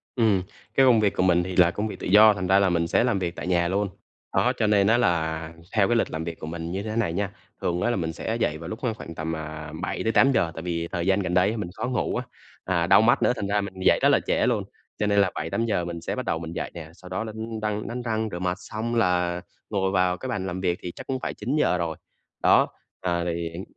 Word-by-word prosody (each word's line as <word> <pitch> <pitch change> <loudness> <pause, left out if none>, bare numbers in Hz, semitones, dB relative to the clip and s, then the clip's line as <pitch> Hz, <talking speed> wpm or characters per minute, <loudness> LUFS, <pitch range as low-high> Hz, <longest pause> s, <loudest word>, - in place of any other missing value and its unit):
Ừm, 105 -6 +3 0.3
cái 135 - +6
công 120 -4 +6
việc 105 -2 +2
của - - +1
mình 90 -1 +4
thì 90 0 -5
là 85 -2 +5
công 105 +3 -2
việc - - -7
tự - - -4
do, 105 +3 +8
thành 95 -2 -3
ra 95 +2 +5
là 100 - +3
mình 85 -1 +1
sẽ - - +3
làm 120 -6 +1
việc 85 -2 -3
tại - - -5
nhà 85 -1 +2
luôn, 100 +2 0 0.5
đó - - +3
cho 110 - +2
nên 100 -1 +4
á 115 - +5
là 80 -7 0 0.2
theo 100 -3 +4
cái 120 - +2
lịch 115 - +1
làm 80 +1 -3
việc 85 0 -6
của 80 - -6
mình 85 +1 -5
như 95 +2 -3
thế 110 0 -4
này 105 -8 0
nha. 100 +2 -1 0.3
Thường 90 0 -1
á - - +2
là 120 - +1
mình 80 -4 -2
sẽ 110 - -3
dậy 80 -9 0
vào 80 +1 -8
lúc 110 - -5
kh - - -3
khoảng 85 -5 -8
tầm, 80 +1 -3
à, 75 -1 -7
7:00-8:00 115 -2 +2
tại 80 - -5
vì 85 -1 -2
thời 85 0 -2
gian 95 +1 +3
gần 90 -3 -2
đây 100 +5 +3
mình 105 -5 -3
khó 115 +3 -2
ngủ 125 -3 -1
á, - - -1 0.4
à, 85 -2 +1
đau 95 +2 +7
mắt 120 +4 +4
nữa 125 - +3
thành 100 - -3
ra 105 +1 +1
mình 100 -1 -6
dậy - - +5
rất - - +5
là - - +5
trễ - - +2
luôn, - - +1 0.4
cho 105 - +1
nên 100 0 +3
là 95 -2 +3
7:00-8:00 95 +2 -1
mình 85 -1 -5
sẽ - - -3
bắt - - -4
đầu 80 - -1
mình 80 0 -6
dậy - - -4
nè, 80 -3 -8
sau 90 +1 -13
đó 95 +3 -2
đánh 110 0 -5
răng 105 0 -2
đánh 120 +1 -4
răng 110 -2 -1
rửa 85 - -4
mặt 90 0 -1
xong 115 +2 -4
là 90 -5 +1 0.3
ngồi 95 -2 0
vào 90 -1 +2
cái 130 - -6
bàn 95 -4 -2
làm 90 0 -4
việc 90 -2 0
thì 90 - -5
chắc - - -10
cũng 130 -1 -2
phải - - -3
9:00 125 -4 +1
rồi. 85 -2 -3 0.5
Đó, - - +5 0.3
ờ 85 -1 0
thì 85 -1 -2
hiện 85 +3 -7
95 Hz, 280 wpm, -25 LUFS, 85-110 Hz, 0.5 s, do